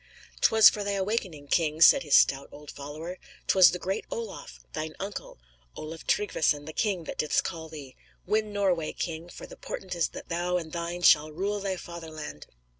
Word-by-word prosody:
"'Twas 220 Hz, -1 st, +7 dB
for 210 Hz, -, +3 dB
thy 200 Hz, 0 st, -1 dB
awakening, 190 Hz, -7 st, -2 dB
king," 155 Hz, 0 st, +1 dB
said 170 Hz, -, +8 dB
his 145 Hz, -5 st, +2 dB
stout 135 Hz, 0 st, +4 dB
old 150 Hz, 0 st, -11 dB
follower. 155 Hz, +6 st, -7 dB, 0.3 s
"'Twas 185 Hz, -2 st, +7 dB
the -, -, -3 dB
great 190 Hz, +4 st, -3 dB
Olaf, 465 Hz, -2 st, -7 dB
thine 155 Hz, 0 st, -4 dB
uncle, 200 Hz, +1 st, -6 dB, 0.4 s
Olaf 160 Hz, +1 st, -8 dB
Tryggvesson 155 Hz, -7 st, +1 dB
the 155 Hz, -, -8 dB
king, 195 Hz, -4 st, 0 dB
that -, -, -7 dB
didst 150 Hz, -, +2 dB
call 165 Hz, -3 st, -6 dB
thee. 145 Hz, -4 st, -10 dB, 0.3 s
Win 215 Hz, +2 st, 0 dB
Norway, 185 Hz, -6 st, 0 dB
king, 165 Hz, 0 st, -5 dB
for -, -, -10 dB
the -, -, -12 dB
portent 185 Hz, -1 st, -6 dB
is 170 Hz, -1 st, +1 dB
that -, -, -10 dB
thou 175 Hz, +1 st, 0 dB
and 160 Hz, -3 st, -6 dB
thine 170 Hz, +1 st, -4 dB
shall 155 Hz, -1 st, +6 dB
rule 200 Hz, +6 st, -2 dB
thy 195 Hz, -2 st, -2 dB
fatherland." 160 Hz, -, -8 dB
170 Hz, 185 wpm, -28 LUFS, 155-195 Hz, 0.4 s, said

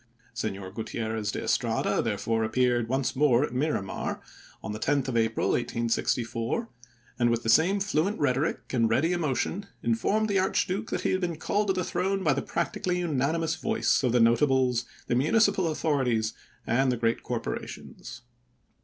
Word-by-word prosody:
Senor 100 Hz, -5 st, -4 dB
Guti 110 Hz, +3 st, -6 dB
errez 110 Hz, -2 st, -2 dB
de -, -, -4 dB
Estrada -, -, +1 dB
therefore 115 Hz, 0 st, -1 dB
appeared 120 Hz, +1 st, +1 dB
once 130 Hz, +1 st, -1 dB
more 135 Hz, -2 st, +4 dB
at 150 Hz, -, -3 dB
Miramar, 130 Hz, -7 st, -2 dB, 0.4 s
on 110 Hz, -, -4 dB
the 105 Hz, -, -5 dB
10th 135 Hz, +2 st, +1 dB
of 125 Hz, -, -3 dB
April, 115 Hz, -1 st, +1 dB
1864, 115 Hz, -, -1 dB, 0.5 s
and, 120 Hz, -1 st, +3 dB
with 115 Hz, 0 st, 0 dB
the 115 Hz, -, -1 dB
same 170 Hz, -, +4 dB
fluent 195 Hz, 0 st, 0 dB
rhetoric 145 Hz, +2 st, -1 dB
and 115 Hz, -3 st, +2 dB
ready 150 Hz, +10 st, +2 dB
emotion, 175 Hz, -, -1 dB, 0.2 s
informed 220 Hz, -1 st, +1 dB
the 200 Hz, -2 st, +2 dB
Archduke 190 Hz, +2 st, 0 dB
that -, -, -2 dB
he -, -, 0 dB
had 185 Hz, -, 0 dB
been 175 Hz, -2 st, -1 dB
called 205 Hz, +5 st, 0 dB
to 190 Hz, -, +2 dB
the 185 Hz, -1 st, -1 dB
throne 195 Hz, +1 st, -1 dB
by 150 Hz, -5 st, +3 dB
the 140 Hz, -, -1 dB
practically 180 Hz, -3 st, -2 dB
unanimous 160 Hz, -1 st, 0 dB
voice 225 Hz, 0 st, +1 dB
of 125 Hz, -3 st, +1 dB
the 125 Hz, -, +3 dB
nota 120 Hz, +5 st, +4 dB
bles, 130 Hz, -3 st, +1 dB, 0.2 s
the -, -, -1 dB
municipal 190 Hz, -, +3 dB
authorities, 130 Hz, -8 st, 0 dB, 0.3 s
and 130 Hz, +2 st, +2 dB
the 125 Hz, -, -1 dB
great 115 Hz, 0 st, 0 dB
cor -, -, -2 dB
porations. 120 Hz, -, -7 dB
130 Hz, 170 wpm, -27 LUFS, 115-180 Hz, 0.5 s, more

